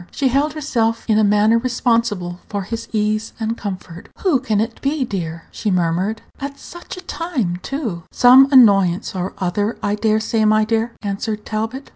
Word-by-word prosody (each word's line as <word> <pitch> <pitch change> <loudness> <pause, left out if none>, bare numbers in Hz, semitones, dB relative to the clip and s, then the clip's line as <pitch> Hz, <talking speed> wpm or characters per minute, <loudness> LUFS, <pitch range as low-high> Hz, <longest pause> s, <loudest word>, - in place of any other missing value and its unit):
She 270 -2 0
held 280 +4 +1
herself 230 -7 -1
in 215 -1 +3
a - - +4
manner 210 +2 +4
responsible 230 -7 0
for 200 -2 -3
his 230 +4 -5
ease 215 0 -1
and 225 0 -1
comfort. 185 -5 -7
"Who 345 -9 +3
can 220 -5 0
it 225 +2 -3
be, 280 -1 0
dear?" 170 -6 -5
she 215 - -3
murmured; 185 +4 0 0.2
"at 280 0 -6
such 345 +5 -10
a - - -8
time, 310 - -3
too!" 275 - -4
Page 305 - -5
150 170 -9 -5
"Some 255 +2 +7
annoyance 195 -8 +4
or 185 0 -3
other, 205 +4 -1
I 205 - 0
dare 215 +1 +1
say, 220 0 0
my 215 0 +4
dear," 225 +1 -1
answered 210 +1 -3
Talbot. 225 +5 -4
220 Hz, 185 wpm, -19 LUFS, 200-250 Hz, 0.2 s, Some